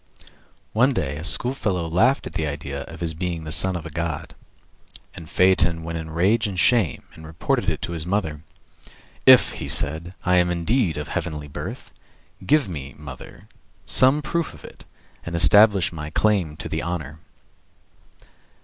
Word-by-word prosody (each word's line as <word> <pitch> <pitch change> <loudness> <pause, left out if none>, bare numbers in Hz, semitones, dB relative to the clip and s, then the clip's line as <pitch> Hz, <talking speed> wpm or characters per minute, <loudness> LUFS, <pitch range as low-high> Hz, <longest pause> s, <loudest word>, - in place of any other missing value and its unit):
One 125 +5 +3
day 75 -7 -2
a 75 - -7
schoolfellow 95 -3 0
laughed 115 +12 +2
at - - -8
the 80 - -2
idea 70 -1 -5
of 80 +1 -12
his 80 -1 -2
being 85 0 -4
the 80 - -7
son 95 +3 +1
of 85 - -5
the 80 - -9
god, 85 +1 -4 0.8
and 80 - -11
Phaeton 85 -3 +2
went 85 0 -5
in 80 0 -8
rage 100 +8 +1
and 95 -3 -4
shame 105 - +2
and 80 - -14
reported 80 0 -2
it - - -4
to - - -4
his 80 -2 -4
mother. 80 -6 -2 0.8
"If," - - +7 0.2
said 80 +3 +3
he, 90 +2 -11
"I 90 0 +3
am 90 0 +3
indeed 90 - 0
of 75 - -5
heavenly 80 -5 -4
birth, 70 - -8 0.5
give 150 -5 +2
me, 70 -6 -7
mother, 70 -4 -11 0.4
some 135 +4 +4
proof 170 +3 -3
of - - -15
it, - - -14 0.4
and 85 - -6
establish 100 +1 +6
my 75 -2 -6
claim 90 -4 0
to - - -5
the 80 - -3
honor." 80 -3 -5
85 Hz, 165 wpm, -22 LUFS, 80-95 Hz, 0.8 s, If